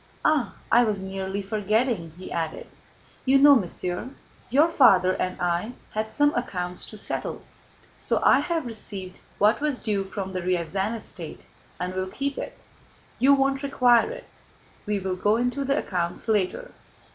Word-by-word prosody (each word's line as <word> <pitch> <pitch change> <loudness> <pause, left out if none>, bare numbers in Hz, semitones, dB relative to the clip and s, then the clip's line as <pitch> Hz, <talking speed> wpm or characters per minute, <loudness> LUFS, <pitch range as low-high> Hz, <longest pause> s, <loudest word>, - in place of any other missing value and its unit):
Ah! 300 -6 +2 0.2
I 240 +1 +6
was 210 -4 -1
nearly 190 +1 -4
forgetting," 215 -2 0
he 185 - -9
added. 165 -2 -3 0.6
"You 270 +1 +5
know, 285 +1 +8
mon 205 -8 +1
cher, 180 +7 -4 0.4
your 290 +6 +5
father 195 - +5
and 185 0 -3
I 175 +6 -1 0.2
had 220 0 -3
some 290 +3 +3
accounts 180 -7 -3
to 215 - -10
settle, - - -4 0.6
so - - 0
I - - +6
have 330 -4 -1
received 200 -5 -6 0.2
what 210 +6 +3
was 295 -3 0
due 205 -3 -1
from 190 -1 -5
the 185 - -2
Ryazán 185 +4 -1
estate 175 -7 -5 0.3
and 180 +1 -3
will 185 0 -2
keep 275 +8 -3
it; - - -6 0.6
you 280 +2 +6
won't 270 0 +1
require 255 - +4
it. - - -8 0.6
We'll 190 -3 -1
go 210 +4 +2
into 245 +3 -1
the 275 +1 +1
accounts 175 +1 -2
later." 220 - 0
210 Hz, 155 wpm, -25 LUFS, 185-260 Hz, 0.6 s, know